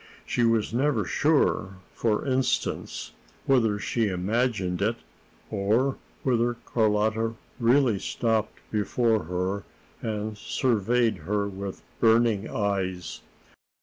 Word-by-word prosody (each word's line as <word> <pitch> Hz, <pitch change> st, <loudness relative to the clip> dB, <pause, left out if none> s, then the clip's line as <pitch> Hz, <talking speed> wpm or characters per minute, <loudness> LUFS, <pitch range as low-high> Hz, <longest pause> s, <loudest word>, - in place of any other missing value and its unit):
She 120 Hz, -, 0 dB
was 115 Hz, -2 st, +2 dB
never 125 Hz, -4 st, +1 dB
sure, 140 Hz, -, +2 dB, 0.2 s
for 110 Hz, -2 st, 0 dB
instance, 130 Hz, -1 st, -1 dB, 0.3 s
whether 115 Hz, -6 st, +3 dB
she 115 Hz, +2 st, 0 dB
imagined 95 Hz, -1 st, 0 dB
it, 110 Hz, +3 st, +2 dB, 0.6 s
or 110 Hz, +7 st, +1 dB, 0.3 s
whether 120 Hz, -2 st, +2 dB
Carlotta 110 Hz, 0 st, +1 dB, 0.2 s
really 120 Hz, -3 st, +4 dB
stopped 110 Hz, 0 st, -1 dB
before 110 Hz, 0 st, +1 dB
her 90 Hz, +3 st, -2 dB, 0.4 s
and 105 Hz, -1 st, -3 dB
surveyed 120 Hz, 0 st, +1 dB
her 100 Hz, +5 st, -1 dB
with 100 Hz, -1 st, -6 dB, 0.2 s
burning 115 Hz, -2 st, +3 dB
eyes. 95 Hz, -5 st, -2 dB
110 Hz, 100 wpm, -26 LUFS, 100-120 Hz, 0.6 s, really